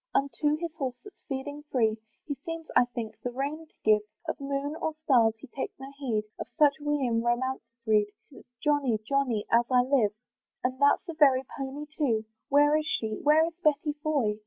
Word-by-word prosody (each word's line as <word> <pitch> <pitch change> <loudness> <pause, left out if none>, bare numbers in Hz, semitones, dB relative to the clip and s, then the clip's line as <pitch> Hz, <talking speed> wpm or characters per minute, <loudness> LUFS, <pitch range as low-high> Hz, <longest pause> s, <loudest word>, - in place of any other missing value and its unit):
Unto 295 +2 +2
his 335 0 -4
horse, 260 -5 -2
that's 410 - -14
feeding 285 +2 -4
free, 220 -4 +2 0.3
He 290 - -2
seems, 325 +4 -6
I - - +6
think, 230 -3 -6
the 245 - -2
rein 285 +6 -4
to - - -36
give; 215 -1 +5 0.3
Of 315 - -3
moon 280 +2 -2
or 315 - -2
stars 230 -6 +4
he 235 - -11
takes 265 +1 -6
no 270 +1 -9
heed; 230 -7 0 0.2
Of - - -4
such 295 -3 +6
we 295 -2 0
in 230 -2 +1
romances 240 0 -1 0.2
read, 210 -2 +4 0.2
'Tis - - -13 0.2
Johnny! 285 -6 +2
Johnny! 260 -6 +1
as 235 +1 +5
I 250 -1 +5
live. 250 -6 +2 0.5
And 255 +1 -1
that's 285 0 +5
the 335 - -5
very 275 -4 +5
pony 275 +2 -5
too. 275 -8 -1 0.2
Where 290 +1 +5
is 310 0 0
she, 220 -7 -1
where 305 +2 +5
is 335 - -4
Betty 300 0 +2
Foy? 255 -10 0
275 Hz, 195 wpm, -28 LUFS, 240-295 Hz, 0.5 s, I